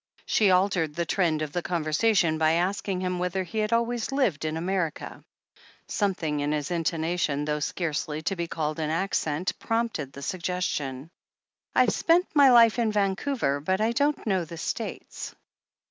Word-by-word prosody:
She 210 -3 +3
altered 180 -5 +2
the 170 - -1
trend 160 -4 +1
of 150 - -5
the 175 - -2
conversation 170 +1 +1
by 160 0 +3
asking 185 +2 -1
him 180 -1 -2
whether 180 +1 -1
he 185 +5 -4
had 215 +1 0
always 235 +1 0
lived 225 - 0
in 155 0 -2
America. 175 -2 -3 0.6
Some 200 -3 0
thing 150 -4 -2
in 145 +1 0
his 150 +3 -2
intonation, 165 -3 0
though 150 0 -1
scarcely 155 -1 -2
to 195 - -1
be 170 -1 -3
called 155 -1 -3
an 155 -1 -1
accent, 165 -1 -1
prompted 225 - -2
the 140 - -9
suggestion. 170 -6 -3 0.6
"I've - - +4
spent 345 +2 +3
my 285 -3 +7
life 235 -1 +6
in 225 -2 +2
Vancouver, 200 - 0
but 185 +6 0
I 220 +2 +2
don't 285 +4 0
know 190 -5 +1
the 165 +1 -9
States." - - -5
180 Hz, 165 wpm, -26 LUFS, 155-205 Hz, 0.6 s, my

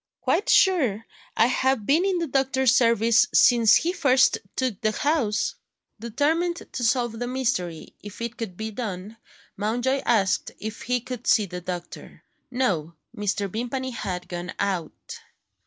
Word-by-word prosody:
"Quite 410 - 0
sure. 255 - +3 0.3
I 225 - +5
have 260 -2 +1
been 305 - +3
in 385 -2 +1
the 340 - -1
doctor's 265 -3 +2
service 230 -2 +4
since 230 -3 +6
he 345 +2 +1
first 260 -7 +3 0.2
took 255 -7 -2
the 215 0 +1
house." 275 -6 0 0.5
Determined 315 +9 -1
to 245 - -4
solve 240 -1 0
the 245 - -3
mystery, 240 -11 -3
if 205 -1 -10
it 235 0 -4
could 210 -7 -6
be 220 0 -4
done, 210 -2 -6 0.4
Mountjoy 245 +6 0
asked 205 -5 +1
if 220 +1 -7
he 250 -1 -1
could 250 -1 -7
see 215 - +4
the 180 -1 -7
doctor. 175 0 -8 0.3
No: 180 -11 -1 0.2
Mr. 205 -1 -1
Vimpany 245 +6 -4
had 180 -6 -5
gone 175 +1 -6
out. 180 -5 -4
235 Hz, 150 wpm, -24 LUFS, 205-260 Hz, 0.5 s, since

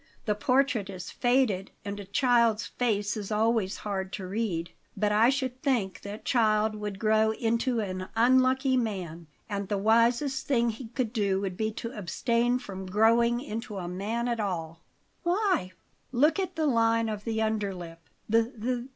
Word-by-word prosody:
"The 210 - +2
portrait 250 -1 +1
is 185 -2 -7
faded, 245 -7 +1 0.2
and 200 0 -4
a 200 - -7
child's 235 0 +2
face 210 -4 -1
is 210 -1 -5
always 215 -2 +1
hard 190 -2 -3
to 190 - -4
read. 185 -4 -2 0.3
But 210 -1 +1
I 220 +3 +5
should 260 -2 -2
think 230 -9 0
that 205 +1 -8
child 215 -2 +2
would 210 -2 -5
grow 220 +1 +3
into 230 +1 0
an 185 -2 -4
unlucky 260 +3 +4
man, 180 -8 -3 0.2
and 200 -2 -3
the 205 - -1
wisest 235 +6 +2
thing 235 -4 +2
he 225 +2 -8
could 235 -1 -3
do 200 -4 +1
would 190 -2 -3
be 220 +3 -1
to 230 +2 -6
abstain 235 +5 0
from 190 -5 -7
growing 230 +4 +3
into 230 -5 -5
a 180 -2 -4
man 210 +7 -2
at 235 -1 -1
all." 165 -5 -3 0.4
"Why?" 360 - +1 0.4
"Look 295 +9 +3
at 375 - -2
the 315 - 0
line 230 -3 +3
of 210 -1 -4
the 225 -1 -2
under 215 -2 0
lip. 170 -3 -8
220 Hz, 165 wpm, -28 LUFS, 200-240 Hz, 0.4 s, I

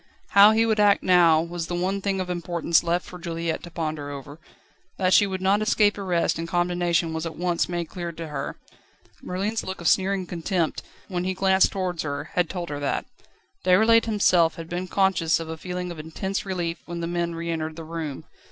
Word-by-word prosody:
How 200 +1 +8
he 225 +1 +3
would 220 -1 +1
act 205 -1 +4
now 170 -3 +5
was 170 -1 -5
the 175 - -3
one 190 +3 -1
thing 195 -1 -1
of 185 - -2
importance 170 -2 +1
left 175 +1 0
for 180 - -10
Juliette 165 -1 -3
to 175 - -9
ponder 155 -3 -4
over. 145 +2 -8 0.6
That 185 -1 +2
she 205 - +6
would 190 -1 -4
not 195 +2 +3
escape 210 -1 +3
arrest 180 -5 0
and 165 - -3
condemnation 175 -1 0
was 160 +1 -3
at 160 - -7
once 175 0 0
made 175 -1 -2
clear 175 0 -5
to 165 -1 -7
her. 140 -2 -5 0.6
Merlin's 200 +5 -2
look 190 - -5
of 170 - -2
sneering 190 +1 +2
contempt, 175 -1 -2 0.3
when 180 -2 -2
he 185 0 -2
glanced 190 0 +3
towards 185 -4 -2
her, 145 0 -4
had 175 -3 +1
told 175 -2 -5
her 145 -1 -4
that. 140 -1 -1 0.6
Déroulède 220 +5 +5
himself 185 -7 +3
had 165 -2 -8
been 180 +2 -4
conscious 185 -5 +2
of 165 -1 -6
a 160 - -4
feeling 180 +2 -5
of 165 - -8
intense 190 +6 -4
relief 175 -3 -2
when 170 0 -5
the - - -2
men 170 0 -2
re 170 0 -3
entered 160 -1 -3
the 165 - -7
room. 160 -3 -5
175 Hz, 205 wpm, -25 LUFS, 165-190 Hz, 0.6 s, How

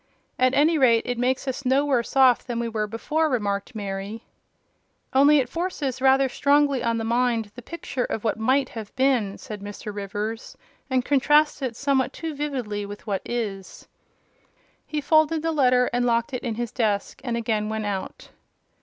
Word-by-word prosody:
"At 255 0 +3
any 310 +2 +4
rate, 235 -4 +4
it 245 -1 -3
makes 260 +2 0
us 265 +2 -3
no 270 +2 +2
worse 260 -3 0
off 260 -3 +5
than 240 -2 -4
we 235 - -1
were 215 -2 -2
before," 305 +9 -1
remarked 205 -3 -2
Mary. 200 +2 -5 0.9
"Only 285 +3 +6
it 260 -3 +1
forces 290 -4 -3
rather 270 0 +4
strongly 280 0 +2
on 230 -1 +1
the 225 - -2
mind 230 -2 0
the 245 - -10
picture 270 -2 -4
of 220 - -4
what 220 -1 -1
might 260 +4 +2
have 220 -3 -8
been," 255 -7 +1
said 210 -2 -8
Mr. 205 +1 -7
Rivers, 205 +3 -5 0.3
"and 255 -1 +1
contrasts 295 +2 +3
it 255 -4 -3
somewhat 270 -1 0
too 325 -1 -5
vividly 255 -8 -3
with 205 0 -9
what 200 -3 -2
is." 205 -6 -5 1.0
He 305 -1 -2
folded 315 +1 +3
the 325 - 0
letter, 250 -4 +3
locked 240 +1 +1
it 250 - -3
in 235 -4 -3
his 235 0 -3
desk, 210 -5 -1
and 240 -3 -2
again 215 -2 -1
went 220 -1 -3
out. 200 -2 -5
245 Hz, 175 wpm, -24 LUFS, 220-275 Hz, 1.0 s, Only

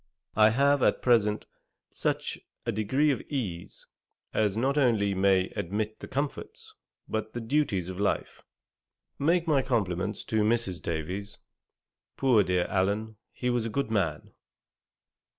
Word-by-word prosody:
I 110 0 +6
have 140 +4 +3
at - - +2
present, 105 -4 +3 0.5
such - - -2 0.3
a - - 0
degree 130 +9 +2
of 135 - -2
ease, 100 - -4 0.5
as 105 -1 +1
not 135 +4 +1
only 115 -8 +3
may 95 -1 +3
admit 105 +3 -3
the - - -8
comforts, 140 +2 -4 0.3
but 110 0 -3
the 120 - -3
duties 115 - 0
of 95 0 -6
life. 100 - -1 0.8
Make 170 +4 +2
my 145 -4 +4
compliments 100 -6 -1
to 110 -1 0
Mrs. 105 -4 +1
Davies. 90 +6 -4 0.8
Poor 130 -6 +4
dear 90 -2 +1
Allen, 105 +3 -1
he 125 0 -2
was 120 -2 +1
a 115 - -3
good 125 0 -2
man.' 85 -9 -1
110 Hz, 135 wpm, -28 LUFS, 95-125 Hz, 0.8 s, I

